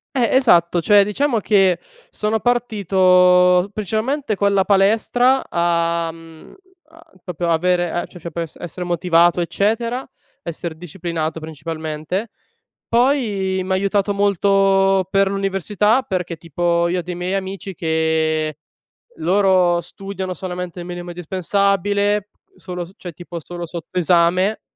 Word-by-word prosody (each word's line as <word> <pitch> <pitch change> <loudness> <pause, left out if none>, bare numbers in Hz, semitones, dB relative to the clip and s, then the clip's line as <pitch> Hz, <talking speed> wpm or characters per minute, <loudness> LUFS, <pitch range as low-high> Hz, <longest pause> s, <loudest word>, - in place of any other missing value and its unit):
Eh, 245 -1 +2
esatto 175 -9 +4
cioè, 205 +4 +5
diciamo 235 +4 0
che, 195 -4 +3 0.3
sono 215 +1 -1
partito 185 -5 +3
principalmente 220 +5 -2
con 200 0 +1
la 190 -1 +3
palestra 225 +6 +3
a 170 -1 0
mhmm, 165 -1 -15 0.4
a 330 +1 -19
proprio 175 -1 -4
avere 175 +1 0
c - - -14
c - - -11
cioè 170 +1 -7
p 155 - -14
esse 165 0 -5
essere 175 +1 -6
motivato, 175 0 +2
eccetera, 230 +8 -1 0.3
esser 170 0 -5
disciplinato 165 -1 -4
principalmente. 160 +5 -5 0.6
Poi 225 -7 +1
m' 185 - -7
ha - - +3
aiutato 200 +1 +1
molto 195 -1 +2
per 195 0 +3
l'università, 200 +4 +1
perché 180 -8 -3
tipo 170 +2 0
io 180 +1 -1
ho - - -2
dei 180 +1 -6
miei 180 +1 -3
amici 195 0 -4
che, 160 -2 0 0.6
loro 180 0 +3
studiano 190 0 -6
solamente 180 -1 -6
il 175 - -7
minimo 175 0 -7
indispensabile 200 +3 0 0.3
solo 180 -1 -6
s 180 - -17
cioè, 175 -2 -8
tipo 175 +1 -8
solo 175 +2 -7
sotto 170 +2 -5
esame, 180 +4 +2
185 Hz, 135 wpm, -20 LUFS, 170-200 Hz, 0.6 s, cioè